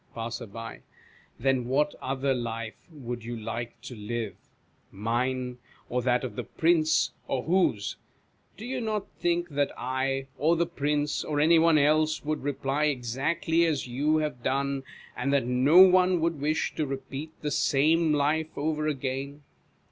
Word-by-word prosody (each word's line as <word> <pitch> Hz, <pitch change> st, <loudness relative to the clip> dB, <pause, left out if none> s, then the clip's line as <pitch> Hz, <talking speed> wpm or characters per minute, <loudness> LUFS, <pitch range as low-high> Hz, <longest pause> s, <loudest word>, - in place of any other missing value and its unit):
Passer. 115 Hz, +1 st, -5 dB, 0.9 s
Then 130 Hz, -1 st, +1 dB
what 145 Hz, +3 st, +1 dB
other 135 Hz, +1 st, 0 dB
life 115 Hz, -2 st, -4 dB, 0.2 s
would 125 Hz, -6 st, -6 dB
you 120 Hz, +1 st, -5 dB
like 115 Hz, +2 st, -5 dB
to 125 Hz, -1 st, -8 dB
live? 110 Hz, 0 st, -4 dB, 0.6 s
Mine, 125 Hz, +4 st, -2 dB, 0.3 s
or 125 Hz, +1 st, 0 dB
that 125 Hz, +1 st, +1 dB
of 130 Hz, -, -5 dB
the 125 Hz, -, -3 dB
Prince, 160 Hz, +1 st, +2 dB, 0.2 s
or 130 Hz, -2 st, -1 dB
whose? 165 Hz, -, +1 dB, 0.6 s
Do 220 Hz, -, -8 dB
you 255 Hz, 0 st, -3 dB
not 215 Hz, -3 st, -2 dB
think 175 Hz, 0 st, 0 dB
that 145 Hz, -1 st, 0 dB
I, 130 Hz, +2 st, -1 dB
or 160 Hz, +5 st, +3 dB
the 170 Hz, +1 st, +2 dB
Prince, 150 Hz, -2 st, -1 dB
or 150 Hz, -1 st, -2 dB
any 160 Hz, +2 st, +5 dB
one 165 Hz, -1 st, +5 dB
else, 155 Hz, +1 st, +2 dB
would 155 Hz, 0 st, -1 dB
reply 140 Hz, +1 st, -1 dB
exactly 150 Hz, +5 st, 0 dB
as 150 Hz, -4 st, -1 dB
you 145 Hz, +6 st, +1 dB
have 150 Hz, -5 st, -2 dB
done; 140 Hz, +2 st, 0 dB, 0.3 s
and 135 Hz, +3 st, -1 dB
that 140 Hz, -4 st, +2 dB
no 130 Hz, +6 st, +3 dB
one 185 Hz, -1 st, +6 dB
would 165 Hz, -3 st, -1 dB
wish 155 Hz, +2 st, 0 dB
to 155 Hz, -, 0 dB
repeat 135 Hz, +3 st, -6 dB
the 150 Hz, -, -1 dB
same 155 Hz, +4 st, +3 dB
life 150 Hz, +2 st, 0 dB
over 155 Hz, +1 st, -1 dB
again 140 Hz, 0 st, -3 dB
140 Hz, 155 wpm, -28 LUFS, 125-155 Hz, 0.9 s, one